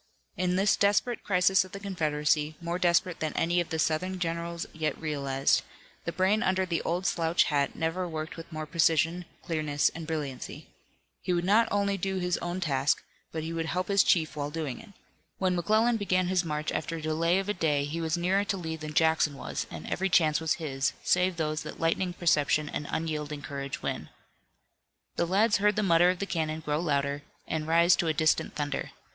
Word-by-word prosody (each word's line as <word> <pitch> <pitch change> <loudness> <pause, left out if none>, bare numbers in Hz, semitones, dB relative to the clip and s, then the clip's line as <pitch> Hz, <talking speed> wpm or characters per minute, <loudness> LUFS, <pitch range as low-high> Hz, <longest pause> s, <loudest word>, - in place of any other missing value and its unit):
In 180 -2 0
this 195 +2 +3
desperate 205 +4 +2
crisis 190 0 +3
of 185 - -14
the 200 - -5
Confederacy, 155 -5 0
more 170 +1 -3
desperate 175 -1 +2
than 155 -1 -2
any 175 +1 +1
of 170 - -5
the 160 - -2
Southern 165 +4 0
generals 170 -1 -3
yet 155 -2 -2
realized, 140 -3 +1 0.4
the - - -1
brain 195 +4 +2
under 190 -2 +1
the 170 -2 -1
old 175 +2 -2
slouch 165 -2 +2
hat 145 -2 0
never 165 +3 -1
worked 155 0 -5
with 165 +1 -10
more 155 -1 -4
precision, 165 +2 +2 0.2
clearness 155 -3 +1
and 160 0 -8
brilliancy. 145 -5 -5 0.5
He 180 - -1
would 175 0 0
not 220 +4 +4
only 200 -1 0
do 190 +2 -1
his 180 -1 0
own 175 +1 -3
task, 140 -4 +1 0.3
but 160 -1 -4
he 165 +1 -4
would 165 -1 -2
help 185 +3 -2
his 200 -1 +5
chief 160 -3 +2
while 145 -1 -3
doing 150 -4 -4
it. 225 - -15 0.5
When 185 -1 +1
McClellan 220 +7 +2
began 185 -3 +1
his 185 -1 +2
march 150 -2 -2
after 165 +2 -3
a 165 - -5
delay 165 +3 +1
of 195 0 -2
a 210 - +1
day 150 -6 +1
he 155 +4 -3
was 160 +1 0
nearer 185 +3 +2
to 200 - -1
Lee 160 -3 -4
than 155 -1 -7
Jackson 160 -2 +3
was - - -4
and 80 -1 -8
every 190 +2 -1
chance 160 -4 +3
was 160 -1 +1
his, 140 -5 -1
save 180 0 +2
those 155 -1 -1
that - - -8
lightning 170 +2 0
perception 155 -3 +2
and 145 - -4
unyielding 150 -2 -3
courage 140 -1 -5
win. - - -3 1.1
The 170 - +1
lads 210 +5 +3
heard 210 +1 +2
the 215 - +1
mutter 175 -1 +5
of 180 - 0
the 200 - -2
cannon 160 -4 -2
grow 150 -1 -1
louder, 140 -3 0 0.3
and 155 -1 -2
rise 170 +2 +5
to 170 - 0
a 160 - +1
distant 155 +1 +1
thunder. 145 -1 -3
165 Hz, 200 wpm, -28 LUFS, 155-185 Hz, 1.1 s, his